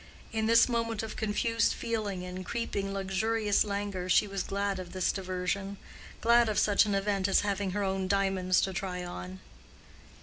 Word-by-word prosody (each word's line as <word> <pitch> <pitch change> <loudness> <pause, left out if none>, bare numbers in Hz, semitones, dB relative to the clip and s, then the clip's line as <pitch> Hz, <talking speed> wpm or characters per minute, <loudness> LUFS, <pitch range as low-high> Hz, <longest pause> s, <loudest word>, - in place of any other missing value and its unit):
In 220 0 0
this 230 0 +6
moment 230 -2 -1
of 220 - -6
confused 230 +1 +1
feeling 210 -5 -3
and 180 +1 -6
creeping 200 -1 -3
luxurious 205 +2 +1
languor 200 -3 -3
she 195 - +5
was 195 -1 -3
glad 200 0 -2
of 180 -1 -8
this 185 -1 +1
diversion—glad 195 +5 -1
of 210 - -1
such 210 +1 +4
an 205 - +1
event 195 -1 0
as 195 - +4
having 200 -1 -1
her 205 +2 -1
own 190 -1 -1
diamonds 190 -2 +2
to 190 - -1
try 180 -1 -3
on. 90 - -7
195 Hz, 165 wpm, -30 LUFS, 185-215 Hz, -, this